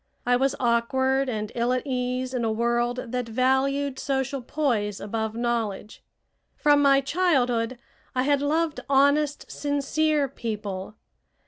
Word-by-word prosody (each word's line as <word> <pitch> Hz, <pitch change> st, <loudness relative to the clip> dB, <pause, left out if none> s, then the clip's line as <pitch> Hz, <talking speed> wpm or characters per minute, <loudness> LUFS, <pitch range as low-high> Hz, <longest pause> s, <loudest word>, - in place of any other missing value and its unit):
I 245 Hz, 0 st, +3 dB
was 265 Hz, +2 st, +1 dB
awkward 260 Hz, +3 st, +1 dB
and 215 Hz, -2 st, -3 dB
ill 240 Hz, +1 st, 0 dB
at 255 Hz, +2 st, -1 dB
ease 255 Hz, -1 st, -2 dB
in 250 Hz, -2 st, -1 dB
a 225 Hz, -, +1 dB
world 240 Hz, +2 st, -1 dB
that 250 Hz, -2 st, -2 dB
valued 265 Hz, +3 st, +1 dB
social 270 Hz, -1 st, -1 dB
poise 235 Hz, -7 st, -1 dB
above 220 Hz, +1 st, -3 dB
knowledge. 230 Hz, -3 st, -3 dB, 0.5 s
From 290 Hz, -1 st, +4 dB
my 275 Hz, -1 st, +5 dB
childhood 255 Hz, -7 st, +1 dB, 0.4 s
I 255 Hz, -, +2 dB
had 285 Hz, 0 st, +2 dB
loved 310 Hz, +2 st, 0 dB
honest, 285 Hz, +2 st, +2 dB
sincere 290 Hz, +1 st, 0 dB
people. 210 Hz, -6 st, -5 dB
255 Hz, 130 wpm, -25 LUFS, 235-280 Hz, 0.5 s, my